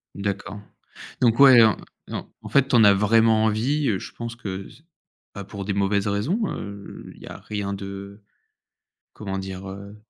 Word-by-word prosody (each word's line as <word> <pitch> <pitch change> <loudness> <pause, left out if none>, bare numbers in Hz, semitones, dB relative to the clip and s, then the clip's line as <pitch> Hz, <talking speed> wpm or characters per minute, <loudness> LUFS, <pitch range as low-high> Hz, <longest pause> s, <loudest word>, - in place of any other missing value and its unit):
D'accord. 100 0 -4 0.6
Donc, 115 -1 +3
ouais, 130 -4 +9
en 110 -1 +3 0.3
non, - - -6
en - - -9
fait, 140 -1 +3
tu 130 - +2
en 115 - +6
as 100 -1 +7
vraiment 110 +2 +3
envie, 130 +7 0
heu, 100 -4 0
je - - -9
pense 115 0 -6
que 100 -4 -6
ç - - -18 0.5
pas 100 -1 -7
pour 100 0 -7
des 100 - -2
mauvaises 100 +1 0
raisons, 105 - -1
heu, 100 0 -8
il - - -18
y - - -11
a - - -8
rien 100 -2 -4
de, 100 +1 -8 0.9
comment 95 -2 -5
dire? 95 0 -7
Heu, 100 +2 -9
100 Hz, 185 wpm, -23 LUFS, 100-115 Hz, 0.9 s, ouais